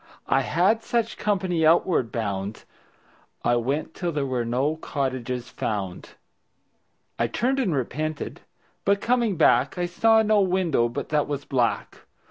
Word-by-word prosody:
I - - +2
had 190 +7 +2
such 230 0 -1
company 185 -5 0
outward 160 - +3
bound. 100 -2 -3 0.8
I 120 - +3
went 140 +7 -2
till 175 -2 -2
there 145 -3 -1
were 130 -3 -1
no 130 +7 0
cottages 130 -5 -3
found. 95 -4 -4 1.0
I 115 - +2
turned 255 - 0
and 195 - +1
repented, 155 +4 -3 0.4
but 200 0 +2
coming 235 -3 +1
back 140 -2 +3
I 175 - 0
saw 220 +5 +4
no 215 -1 +3
window 180 -10 +1
but 120 - -5
that 150 -1 +1
was 145 -1 -4
black. 125 -4 -1
155 Hz, 140 wpm, -25 LUFS, 125-190 Hz, 1.0 s, saw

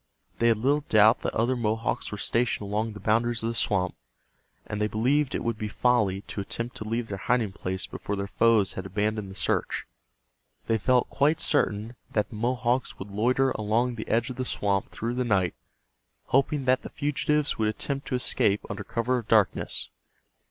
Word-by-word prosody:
They 115 - +4
had 115 -2 +4
little 140 +6 +2
doubt 110 +1 +6
that - - -3
other 120 +4 +2
Mohawks 115 -1 -1
were 105 - -4
stationed 115 -1 0
along 110 +2 -1
the 105 - -9
boundaries 115 +3 +1
of 115 - 0
the - - -2
swamp, 95 -5 0 0.7
and 105 0 -4
they 105 - +2
believed 130 +7 +1
it - - -2
would 115 -2 -2
be 110 - -2
folly 105 -4 +1
to 100 - -6
attempt 115 +4 -4
to 110 - -6
leave 115 0 -2
their 100 -1 -4
hiding 115 -2 +1
place 95 -1 -3
before 100 - -5
their 100 0 -2
foes 105 0 +3
had 95 0 -5
abandoned 105 +1 -1
the 95 - -10
search. - - 0 0.8
They 115 -1 +1
felt 125 +3 +2
quite 150 +3 +2
certain 115 -5 +1 0.2
that 105 -2 +1
the - - -8
Mohawks 120 +2 0
would 100 +1 -8
loiter 125 +6 +2
along 115 +3 0
the 110 -2 -6
edge 120 +4 +1
of 125 - -8
the 130 - -1
swamp 100 -5 0
through 115 +2 -3
the 125 +1 0
night, 95 -7 +1 0.8
hoping 140 +1 +2
that 130 0 +3
the - - -8
fugitives 150 0 0
would 110 - +2
attempt 140 +5 -4
to 130 - -1
escape 105 -4 +1
under - - -5
cover 125 +2 0
of 115 - -10
darkness. 105 -6 +2
115 Hz, 195 wpm, -27 LUFS, 105-125 Hz, 0.8 s, doubt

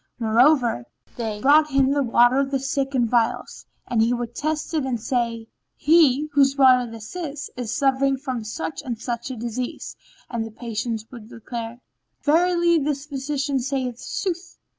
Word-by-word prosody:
Moreover, 235 - +3 0.3
they 220 -3 -4
brought 300 +3 +5
him 270 -1 +3
the 285 0 +2
water 245 +1 +4
of 275 -1 0
the 275 - 0
sick 270 +1 -2
in 240 -2 +2
phials,[FN#13] 230 -1 -1 0.2
and 230 -2 +2
he 230 +2 +3
would 240 -1 -5
test 310 +3 -3
it 310 -3 +1
and 255 -3 -2
say, 230 -1 -2 0.3
"He, 300 -3 +4
whose 275 -1 +3
water 255 -3 +5
this 225 +6 -10
is, 300 -5 -5
is 245 -3 -4
suffering 270 +1 +2
from 255 -4 -4
such 290 +8 -5
and 245 -6 -5
such 235 +1 -4
a 260 - -5
disease," 240 +2 -5 0.3
and 235 -2 -3
the 225 - -6
patient 225 0 -4
would 230 -3 -11
declare, 230 +1 -7 0.4
"Verily 340 +2 +3
this 285 -1 -2
physician 280 -1 -2
sayeth 255 -2 -3
sooth." 360 -2 -4
260 Hz, 165 wpm, -23 LUFS, 235-285 Hz, 0.4 s, brought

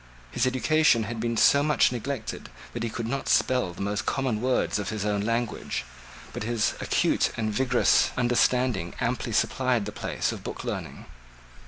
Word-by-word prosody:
His 130 - +1
education 130 -1 +3
had 115 +1 -5
been 115 0 -1
so 140 - +5
much 150 -3 +3
neglected 125 -1 -5 0.2
that 120 - -4
he 115 - -1
could 115 +1 -4
not 135 +3 -3
spell 125 -8 +2
the 95 - -6
most 105 +3 -2
common 130 -6 -1
words 125 -4 +1
of 100 - -3
his 110 -2 -3
own 105 -1 0
language: 115 - -2 0.5
but - - -5
his 115 0 0
acute - - +2
and 110 -1 -1
vigorous 130 +3 +3
understanding 125 -6 +1
amply 120 0 -1
supplied 125 0 +1
the 105 - -5
place - - -2
of - - -8
book - - -6
learning. - - -5
115 Hz, 170 wpm, -26 LUFS, 105-130 Hz, 0.5 s, so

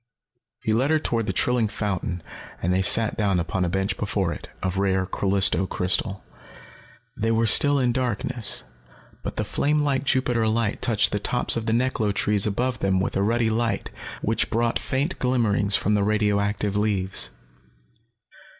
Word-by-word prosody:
He 110 - 0
led 130 +6 +1
her 160 - +3
toward 115 -7 -2
the - - 0
trilling 125 -3 +1
fountain 95 -4 -3 0.4
and 90 +1 0
they 95 - +1
sat 110 +4 +5
down 100 -5 +1
upon 85 +2 -2
a 90 - 0
bench 95 +2 -1
before - - -1
it, - - -10
of 95 +1 -1
rare 95 -1 +1
Callisto 95 0 +2
crystal. 95 +2 -1 0.9
They 115 - -1 0.2
still 145 +6 +5
were 135 - +1
in 120 - +2
darkness, 120 -2 -2 0.6
but - - -6
the - - -2
flame 150 +1 0
like 140 -2 0
Jupiter 125 -4 +1
light 110 -1 -1
touched 110 -3 +3
the 105 - -1
tops 125 +4 +1
of 115 0 -4
the - - +1
neklo 115 -3 0
trees 105 +1 +2
above 120 +3 -2
them 95 -1 +1
with 95 - -2
a 95 - +1
ruddy 115 +2 +1
light 115 +1 -2 0.3
which - - 0
brought 115 +1 0
faint 140 +7 -2
glimmerings 110 -6 +2
from 105 - +1
the 105 - +2
radioactive 105 -1 0
leaves. 100 -2 -1
105 Hz, 170 wpm, -24 LUFS, 100-120 Hz, 0.9 s, sat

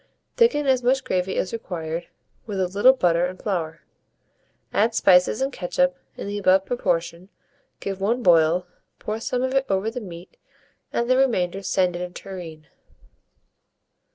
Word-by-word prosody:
Thicken 380 -12 +3
as 260 -2 +3
much 260 +3 +2
gravy 185 +1 -1
as 190 - -2
required, 170 -6 -5 0.4
with 200 -3 -3
a 185 - +1
little 205 +8 +5
butter 175 -8 +2
and 185 +1 -9
flour; 165 -5 -3 0.9
add 225 +2 +2
spices 180 +4 +4
and 270 0 -2
ketchup 270 +9 0 0.2
in - - -6
the 205 0 -3
above 190 0 +3
proportion, 170 -6 -2 0.5
give 195 -1 -5
one 235 +5 0
boil, 170 0 +4 0.3
pour 215 +1 -4
some 250 +2 -2
of 260 0 -1
it 270 0 +1
over 195 +3 0
the 250 +1 -6
meat, 175 -2 -11 0.5
and 235 - -1
the 255 +1 +3
remainder 195 -8 +1
send 185 -2 +1
in 175 - -4
a 180 - -4
tureen. 175 -4 -9
195 Hz, 155 wpm, -23 LUFS, 175-240 Hz, 0.9 s, little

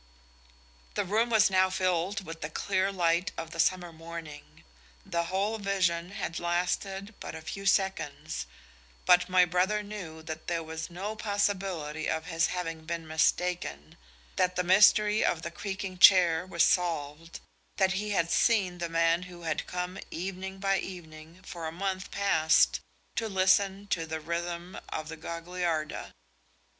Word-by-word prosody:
The - - 0
room 220 +5 +1
was 220 -3 +4
now 185 0 +4
filled 185 +2 0
with 165 -1 -8
the 150 - -3
clear 190 +3 0
light 175 -1 +1
of 160 - -5
the 165 - -8
summer 175 0 +1
morning: 165 -2 -10 0.4
the 170 0 -1
whole 200 +5 -1
vision 180 -4 0
had 165 -5 -4
lasted 190 +4 -1
but - - -7
a 160 - -7
few 195 +4 -5
seconds, 185 - 0 0.6
but 180 0 +5
my 180 -1 +6
brother 185 +4 +1
knew 180 -7 -8
that 160 0 -7
there 170 -1 -1
was 160 +1 -6
no 195 +5 -5
possibility 195 -7 -1
of 160 0 -2
his 165 -1 +1
having 165 -3 -4
been 165 0 -4
mistaken, 155 - 0 0.4
that 180 0 +2
the 180 - +1
mystery 210 +3 +5
of 165 -1 0
the 170 - -4
creaking 195 0 -5
chair 180 -2 +7
was 170 -2 +2
solved, 165 -2 0 0.4
that 190 -2 +3
he 210 +3 -2
had 170 -5 +1
seen 190 -7 +2
the 170 -1 -2
man 165 +1 +2
who 175 -1 -11
had 160 -1 -2
come 180 +1 -4
evening 190 +2 -5
by 195 0 +1
evening 165 -1 -9
for 170 -2 -6
a - - -4
month 185 +2 -3
past 160 -5 +3 0.4
to 225 -1 -1
listen 195 +1 +2
to 165 -5 -2
the 160 0 -3
rhythm 170 +2 -4
of 155 0 -4
the 160 - -5
Gagliarda. 170 -1 -3
180 Hz, 155 wpm, -29 LUFS, 165-195 Hz, 0.6 s, chair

